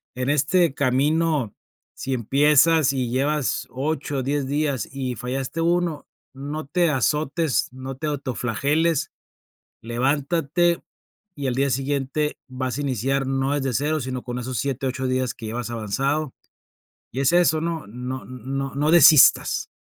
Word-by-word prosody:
en 125 +1 -2
este 150 +3 +2
camino 145 -1 +1 0.4
si 135 - -3
empiezas 145 +4 +4
y 130 -3 -1
llevas 140 +2 0
8, 140 0 -2
10 140 0 -1
días 145 -3 -1
y 130 -2 -3
fallaste 130 +7 -3
1, 170 -2 0 0.3
no 145 +3 -5
te 175 +3 +2
azotes, 150 +2 0
no 130 0 -7
te 155 - -5
autoflageles, 145 +3 0 0.7
levántate, 145 +7 0 0.5
y 140 -2 -3
al 125 - -1
día 135 +1 +1
siguiente 140 +2 -1
vas 130 -1 -3
a 145 - -2
iniciar, 135 +1 -1
no 135 +1 0
desde 135 -3 -1
0 150 +4 0
sino 130 -1 -4
con 125 0 -5
esos 125 -1 -4
7, 135 0 -2
8 130 0 -2
días 130 -1 -1
que 115 - -9
llevas 120 +2 -4
avanzado, 135 +7 -2 0.8
y 135 - -2
es 140 - +3
eso, 160 -3 +3
¿no? 165 -7 -3
No 125 +4 -6
no 135 +2 -5
no 150 +2 +1
desistas. 155 -4 +6
135 Hz, 140 wpm, -23 LUFS, 130-150 Hz, 0.8 s, desistas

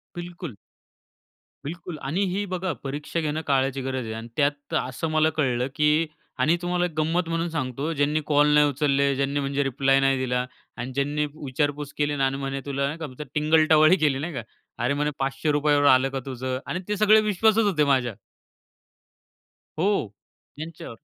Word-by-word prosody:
बिलकुल. 175 - -7 1.1
बिलकुल 170 +1 -6
आणि 165 +8 0
ही 205 +2 -1
बघा 185 0 -1
परीक्षा 145 +4 -3
घेणं 155 0 -2
काळाची 135 -1 +1
गरज 130 -1 -3
आहे. 110 - -5
अन् 115 +1 -7
त्यात 145 0 0
असं 130 +5 -3
मला 155 0 +3
कळलं, 125 -3 +1
की 150 +2 +3 0.3
आणि 160 +2 +4
तुम्हाला 175 0 0
एक 175 - -3
गंमत 165 +2 0
म्हणून 165 +1 -1
सांगतो 145 -1 -3
ज्यांनी 150 +1 +1
कॉल 145 0 +4
नाही 150 0 +6
उचलले, 140 -1 +1
ज्यांनी 140 +1 0
म्हणजे 140 0 0
रिप्लाय 135 0 +2
नाही 135 -1 +3
दिला 125 -1 -1 0.4
अन् 130 +2 -5
ज्यांनी 145 +3 0
विचारपूस 145 0 -2
केली 145 0 +1
आणि 135 -1 0
म्हणे 135 0 -3
तुला 140 +1 -1
का 150 -1 -6
टिंगल 155 +1 +3
टवाळी 155 +3 +6
केली 145 -5 +1
नाही 165 +4 -4
का? 125 - -3 0.4
"अरे, 125 +4 +2
म्हणे 150 +1 0
₹500 145 +2 +1
आलं 130 0 +5
का 135 - -3
तुझं?" 130 -1 -3
आणि 180 - -3
ते 210 - -1
सगळे 215 +1 +6
विश्वासात 215 +2 +3
होते 185 -8 +2
माझ्या. 125 -3 0 1.7
हो, 195 - +1 0.5
त्यांच्यावर. 155 -6 -8
145 Hz, 165 wpm, -25 LUFS, 135-160 Hz, 1.7 s, नाही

